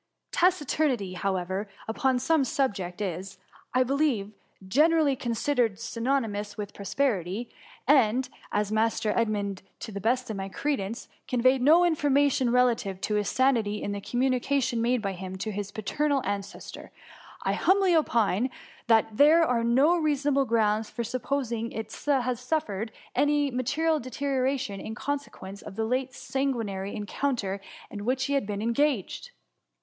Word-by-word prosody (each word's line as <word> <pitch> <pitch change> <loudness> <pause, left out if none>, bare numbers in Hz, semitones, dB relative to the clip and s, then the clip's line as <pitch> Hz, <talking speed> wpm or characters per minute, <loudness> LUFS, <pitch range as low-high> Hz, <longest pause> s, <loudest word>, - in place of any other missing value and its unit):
Taciturnity, 295 - +1
however, 190 +1 -2 0.2
upon 255 +3 +1
some 285 +4 +2
subjects, 210 -8 -1
is, 190 +1 -5 0.3
I 255 - +3
believe, 260 -6 0 0.4
generally 300 - +4
considered 235 -3 0
sy 230 0 -6
nonymous 220 -5 -1
with 205 -1 -5
prosperity; 200 -1 -1 0.4
and, 255 -2 +4 0.2
as 210 0 0
Master 220 0 +1
Ed 230 -2 +2
mund, 200 -2 -2 0.2
to - - -6
the 200 -1 -5
best 250 +4 +1
of 210 - -4
my 195 0 -4
credence, 230 -2 -3 0.2
conveyed 255 +1 +3
no 325 +7 +6
information 285 -5 +2
relative 235 -6 +2
to 210 - -1
his 210 -1 +1
sanity 230 -6 +1
in 205 - -2
the 200 0 -4
t^om 245 +5 0
munication 255 -1 0
made 240 0 +1
by 195 - -1
him 185 0 -7
to 215 +3 -3
his 205 0 -4
paternal 280 +6 0
an 200 0 0
cestor, 200 - -10 0.5
I - - +1
humbly 380 -1 +3
opine 235 - +2 0.4
that 225 -1 +3
there 320 +3 +6
arelno 255 +7 +3
rea 305 -2 +2
sonable 280 -1 +1
grounds 220 -1 +1
for 235 - -4
supposing 235 -1 -2
it 220 -1 -6
has 255 -4 +1
suffered 230 -6 -2 0.2
any 290 -1 +2
material 300 +6 +1
deterioration 260 -3 -1
in 220 - -6
consequence 245 -8 -5
of - - -9
the 220 +1 -1
late 255 +3 -1
sanguinary 230 -9 -2
encounter 210 -2 -2 0.3
in 205 -1 -6
which 255 +3 0
he 280 - -1
has 275 -6 +1
been 205 0 -3
engaged. 235 -2 0
235 Hz, 150 wpm, -27 LUFS, 205-275 Hz, 0.5 s, no